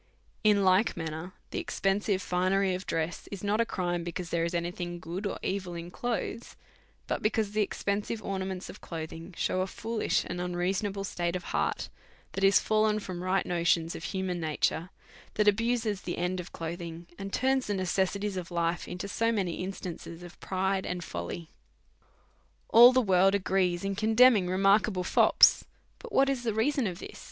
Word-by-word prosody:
In 205 Hz, -2 st, +4 dB
like 190 Hz, +3 st, +3 dB
manner, 160 Hz, +2 st, -5 dB, 0.2 s
the -, -, -2 dB
expensive 195 Hz, 0 st, 0 dB
finery 185 Hz, +1 st, +1 dB
of 185 Hz, +2 st, -5 dB
dress 165 Hz, +1 st, -2 dB
is 200 Hz, -1 st, -6 dB
not 205 Hz, +2 st, +2 dB
a 230 Hz, -, 0 dB
crime, 175 Hz, -2 st, -2 dB
because 175 Hz, 0 st, -5 dB
there 170 Hz, -1 st, +1 dB
is 170 Hz, +1 st, -2 dB
any 170 Hz, 0 st, -1 dB
thing 175 Hz, -1 st, -5 dB
good 175 Hz, +4 st, -4 dB
or -, -, -4 dB
evil 185 Hz, -3 st, -2 dB
in 170 Hz, +1 st, -7 dB
clothes, 235 Hz, +1 st, -3 dB, 0.5 s
but -, -, -2 dB
because 215 Hz, -1 st, 0 dB
the 215 Hz, +1 st, +1 dB
expensive 205 Hz, +2 st, -2 dB
ornaments 190 Hz, -1 st, -3 dB
of -, -, -11 dB
cloth 160 Hz, -2 st, -6 dB
ing* 165 Hz, +2 st, -10 dB
shew 185 Hz, -, 0 dB
a 185 Hz, -, -1 dB
foolish 225 Hz, +3 st, -1 dB
and 175 Hz, 0 st, -4 dB
unreasonable 190 Hz, +3 st, -1 dB
state 175 Hz, -2 st, -2 dB
of 180 Hz, -, -3 dB
hearty -, -, -1 dB, 0.4 s
that 195 Hz, -, -3 dB
is 195 Hz, 0 st, +6 dB
fallen 215 Hz, 0 st, +2 dB
from 185 Hz, -4 st, -6 dB
right 185 Hz, +1 st, +1 dB
notions 170 Hz, -1 st, +1 dB
of -, -, -6 dB
human 190 Hz, -2 st, -2 dB
nature, 160 Hz, +2 st, 0 dB, 0.5 s
that 210 Hz, 0 st, +2 dB
abuses 225 Hz, -1 st, +1 dB
the 175 Hz, -, -4 dB
end 180 Hz, +1 st, -1 dB
of 180 Hz, -, -7 dB
clothing, 170 Hz, 0 st, -6 dB
and 195 Hz, 0 st, -5 dB
turns 265 Hz, +2 st, +1 dB
the 205 Hz, -, 0 dB
necessities 190 Hz, +1 st, -1 dB
of 175 Hz, -2 st, -5 dB
life 170 Hz, 0 st, -1 dB
into 180 Hz, +2 st, -5 dB
so 230 Hz, +3 st, +1 dB
many 190 Hz, -7 st, -1 dB
instances 175 Hz, -2 st, -7 dB
of 175 Hz, -1 st, -12 dB
pride 190 Hz, 0 st, -1 dB
and 180 Hz, -1 st, -4 dB
folly. 90 Hz, -, -6 dB, 1.2 s
All 240 Hz, +2 st, +9 dB
the 255 Hz, 0 st, +3 dB
world 190 Hz, 0 st, +4 dB
agree 185 Hz, -2 st, +1 dB
in 195 Hz, +2 st, -2 dB
condemning 220 Hz, -1 st, +5 dB
remarkable 195 Hz, 0 st, +3 dB
fops. -, -, +5 dB, 0.4 s
Now, -, -, -7 dB
what 275 Hz, -9 st, +3 dB
is 270 Hz, -3 st, 0 dB
the 225 Hz, -3 st, -2 dB
reason 265 Hz, +2 st, +1 dB
of 180 Hz, -2 st, -6 dB
it -, -, -9 dB
190 Hz, 180 wpm, -29 LUFS, 175-205 Hz, 1.2 s, All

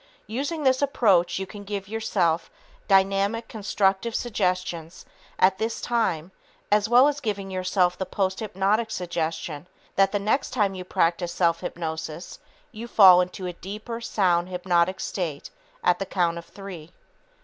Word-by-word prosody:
Using 285 Hz, +8 st, -3 dB
this 260 Hz, 0 st, +3 dB
approach, 205 Hz, -11 st, +3 dB
you 190 Hz, -, -3 dB
can 205 Hz, +1 st, -10 dB
give 200 Hz, -1 st, -5 dB
yourself 190 Hz, -6 st, 0 dB, 0.4 s
dynamic, 195 Hz, +3 st, +2 dB
constructive 205 Hz, +1 st, 0 dB
suggestions 180 Hz, -6 st, -2 dB, 0.3 s
at 190 Hz, +1 st, +3 dB
this 225 Hz, +1 st, -2 dB
time 190 Hz, -8 st, -1 dB, 0.4 s
as 210 Hz, +1 st, +3 dB
well 250 Hz, +3 st, +7 dB
as 290 Hz, -1 st, -1 dB
giving 200 Hz, -5 st, -3 dB
yourself 185 Hz, -1 st, +1 dB
the 190 Hz, -, -1 dB
posthypnotic 200 Hz, +2 st, 0 dB
suggestion 165 Hz, -4 st, -3 dB, 0.3 s
that 195 Hz, 0 st, +4 dB
the 205 Hz, -, +1 dB
next 215 Hz, +7 st, 0 dB
time 205 Hz, -5 st, +1 dB
you 185 Hz, -1 st, -6 dB
practice 175 Hz, -1 st, 0 dB
self 170 Hz, -2 st, +1 dB
hypnosis, 160 Hz, 0 st, -5 dB, 0.3 s
you 230 Hz, +1 st, -8 dB
will -, -, -23 dB
fall 185 Hz, -4 st, +9 dB
into 180 Hz, +1 st, -4 dB
a 180 Hz, -, -4 dB
deeper, 215 Hz, +6 st, -7 dB
sound, 180 Hz, -6 st, +1 dB
hypnotic 180 Hz, 0 st, +1 dB
state 165 Hz, -7 st, -4 dB, 0.3 s
at 180 Hz, 0 st, +3 dB
the 195 Hz, -, -3 dB
count 170 Hz, -3 st, 0 dB
of 170 Hz, -, -12 dB
three. 180 Hz, -5 st, -10 dB
190 Hz, 150 wpm, -25 LUFS, 175-215 Hz, 0.4 s, fall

